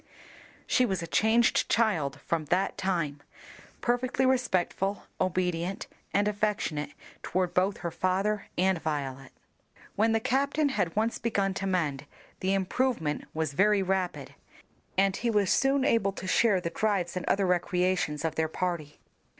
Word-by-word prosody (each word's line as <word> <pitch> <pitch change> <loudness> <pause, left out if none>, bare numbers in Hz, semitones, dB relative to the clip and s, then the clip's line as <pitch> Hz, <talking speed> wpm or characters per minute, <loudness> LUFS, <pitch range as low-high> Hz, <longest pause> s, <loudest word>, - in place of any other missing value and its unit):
She 255 - +3
was 190 -8 -1
a - - -3
changed 220 +6 +3
child 155 -12 +1
from 165 -2 -1
that 180 +6 0
time, 165 -7 -2 0.6
perfectly 250 +2 +1
respectful, 200 -6 0 0.2
obedient, 180 0 -1 0.3
and 205 +1 +2
affectionate 205 -8 -1 0.3
toward 180 -1 -1
both 190 +2 +1
her 170 - -1
father 195 +4 0
and 185 -2 +2
Violet. 135 -3 -4 0.6
When 220 +2 +3
the 225 - +2
captain 280 +5 +1
had 175 -11 -1
once 220 +2 0
begun 200 -4 0
to 195 0 -3
mend, 150 -7 -1 0.3
the 190 +1 +1
improvement 195 - -1
was 160 -2 -1
very 200 +4 +3
rapid, 190 -1 -2 0.6
and 195 0 +3
he 240 - -1
was 205 -4 +2
soon 270 0 +3
able 210 -7 +2
to 185 - -7
share 205 +3 +3
in 180 - -1
the 170 - -2
drives 190 -4 0
and 180 - -2
other 195 0 +2
recreations 180 -3 0
of 160 - 0
their 160 0 0
party. 165 -4 -3
190 Hz, 150 wpm, -28 LUFS, 170-215 Hz, 0.6 s, She